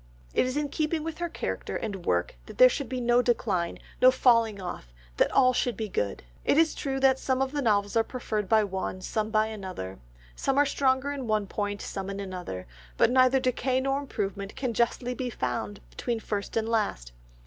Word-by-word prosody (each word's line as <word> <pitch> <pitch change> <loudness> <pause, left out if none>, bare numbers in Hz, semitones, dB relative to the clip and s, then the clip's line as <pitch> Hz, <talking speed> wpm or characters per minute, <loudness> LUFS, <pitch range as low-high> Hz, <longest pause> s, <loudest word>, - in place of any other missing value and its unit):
It - - +3
is 255 +3 -2
in 295 -1 -1
keeping 310 +1 -1
with 325 0 -5
her 345 0 -2
character - - -4
and 195 -5 -4
work 85 0 +1
that - - -10
there 255 - +9
should 270 0 -3
be 255 -1 -2
no 240 0 +4
decline, 205 -8 0 0.2
no 255 - +9
falling 230 -5 +3
off, 175 - -7 0.3
that - - +3
all 255 -1 +5
should 245 -3 0
be 220 -1 -3
good; 100 - -2 0.2
it - - +3
is 325 -1 +4
true 270 -2 -2
that 265 -1 +4
some 260 -1 0
of 265 0 0
the 290 0 -1
novels 205 -4 +1
are 225 - +4
preferred 215 -5 -3
by 220 -1 +5
one, 190 -1 -3
some 215 +3 -2
by 215 -1 +3
another; 185 - -6 0.4
some 270 - 0
are 290 - +6
stronger 265 0 +1
in 275 -4 -4
one 215 -2 +1
point, 205 +1 -3
some 195 -1 -5
in 200 0 -4
another, 180 - -5 0.3
but - - +4
neither 255 +1 +5
decay 255 0 +1
nor 270 +1 0
improvement 200 -7 -4
can 255 -3 -2
justly 240 +2 0
be 250 0 -3
found 120 - -3
between 235 - -2
first 205 -1 -3
and 225 0 0
last. 210 - -1
230 Hz, 205 wpm, -28 LUFS, 200-260 Hz, 0.4 s, there